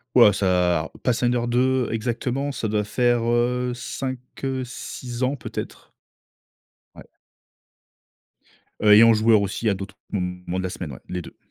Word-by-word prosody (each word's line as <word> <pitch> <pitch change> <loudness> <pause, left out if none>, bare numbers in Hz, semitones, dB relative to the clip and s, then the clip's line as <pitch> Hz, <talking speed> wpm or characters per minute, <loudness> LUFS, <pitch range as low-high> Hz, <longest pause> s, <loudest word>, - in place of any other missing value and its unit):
Waouh 105 - +8
ça 90 -4 +1
Pathfinder 120 0 +1
2 125 +1 +2
exactement, 125 +5 -2
ça 115 - -3
doit 105 0 0
faire, 120 +3 +1
heu, 125 +1 +1
5, 130 +1 -4 0.3
heu, 130 -1 -1
6 125 -1 -7
ans 130 +3 +1
peut 120 - -9
être? - - -7 1.0
Ouais. - - -13 1.7
Heu, 105 -1 +6
et 105 +2 +9
en 115 0 +7
joueur 110 -1 +4
aussi 100 +3 -1
à - - +2
d'autres 95 0 -7 0.2
moments 90 -2 -3
de 95 - -2
la 95 - -2
semaine, 90 -4 -6
ouais, 60 - -10
les 90 0 -3
2. - - -12
115 Hz, 155 wpm, -23 LUFS, 95-125 Hz, 1.7 s, et